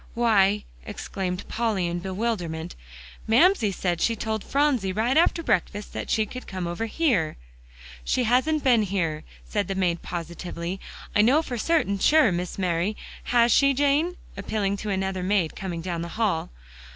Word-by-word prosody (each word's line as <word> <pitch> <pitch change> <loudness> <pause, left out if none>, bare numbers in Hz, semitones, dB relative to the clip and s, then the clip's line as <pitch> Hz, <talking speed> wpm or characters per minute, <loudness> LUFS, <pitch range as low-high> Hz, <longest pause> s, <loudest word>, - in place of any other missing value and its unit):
"Why," 210 -3 +3 0.2
exclaimed 190 -3 -5
Polly 220 -5 0
in 175 0 -2
bewilderment, 180 -4 -3 0.5
"Mamsie 240 - +4
said 175 -2 -2
she 230 - +2
told 220 -1 -3
Phronsie 275 -9 +1
right 225 +7 0
after 335 +1 +3
breakfast 205 - -1
that - - -5
she 220 - +2
could 255 +4 -9
come 185 -2 -4
over 175 +7 -3
here." 225 - +1 0.7
"She 250 - +1
hasn't 260 +6 +2
been 245 -4 +5
here," 170 -6 -1 0.2
said 205 -2 -1
the 195 - -3
maid 175 -3 0
positively. 175 +1 -5 0.4
"I 210 - +6
know 270 +9 +4
for 255 - -5
certain 260 -10 +1
sure, 300 -2 +5
Miss 175 0 -3
Mary. 180 +2 0 0.3
Has 240 -1 +4
she, 275 +2 +4
Jane?" 290 +6 +2 0.2
appealing 200 0 -1
to 210 +1 -5
another 190 -1 -1
maid 185 -3 0
coming 175 -3 -4
down 170 -1 -3
the 170 - -4
hall. 200 -8 0
205 Hz, 160 wpm, -25 LUFS, 180-240 Hz, 0.7 s, I